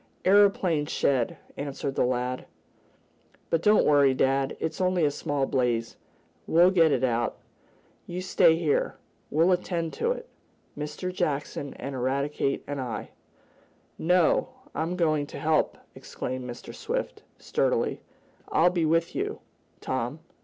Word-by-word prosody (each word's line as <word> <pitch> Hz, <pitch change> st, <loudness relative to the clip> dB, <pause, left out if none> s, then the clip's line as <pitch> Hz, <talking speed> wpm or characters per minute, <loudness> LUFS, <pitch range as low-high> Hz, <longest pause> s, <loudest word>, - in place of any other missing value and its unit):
"Aeroplane 190 Hz, -6 st, +4 dB
shed," 130 Hz, -6 st, 0 dB, 0.2 s
answered 140 Hz, -1 st, -3 dB
the -, -, +1 dB
lad. 125 Hz, 0 st, -2 dB, 1.0 s
"But 165 Hz, -, +2 dB
don't 210 Hz, +3 st, +5 dB
worry 140 Hz, -3 st, +5 dB
dad. 135 Hz, +1 st, +1 dB
It's 160 Hz, -, -3 dB
only 180 Hz, -3 st, +2 dB
a 145 Hz, -, +2 dB
small 145 Hz, -2 st, -1 dB
blaze. 120 Hz, -4 st, 0 dB, 0.5 s
We'll 175 Hz, +3 st, +5 dB
get 165 Hz, -4 st, +4 dB
it 130 Hz, -2 st, +1 dB
out. 120 Hz, -2 st, 0 dB, 0.7 s
You 175 Hz, +1 st, -4 dB
stay 185 Hz, -3 st, +4 dB
here. 160 Hz, -3 st, 0 dB, 0.3 s
We'll 165 Hz, +5 st, +3 dB
attend 175 Hz, -2 st, -1 dB
to 470 Hz, -, 0 dB
it -, -, -5 dB, 0.5 s
Mr. 150 Hz, +5 st, -4 dB
Jackson 145 Hz, -3 st, -2 dB
and 140 Hz, -, -6 dB
Eradicate 135 Hz, +2 st, -1 dB
and 145 Hz, -1 st, -4 dB
I." 120 Hz, -3 st, -5 dB, 0.9 s
"No 180 Hz, 0 st, +3 dB, 0.2 s
I'm 165 Hz, +3 st, -2 dB
going 155 Hz, -4 st, +1 dB
to -, -, -8 dB
help!" 155 Hz, 0 st, +1 dB, 0.2 s
exclaimed 130 Hz, 0 st, -6 dB
Mr. 120 Hz, -, -8 dB
Swift, -, -, -4 dB, 0.2 s
sturdily. -, -, 0 dB, 0.5 s
"I'll 175 Hz, +2 st, +4 dB
be 175 Hz, -3 st, +1 dB
with 165 Hz, +1 st, +1 dB
you, -, -, -3 dB, 0.4 s
Tom. 130 Hz, +4 st, -3 dB
150 Hz, 130 wpm, -27 LUFS, 135-170 Hz, 1.0 s, don't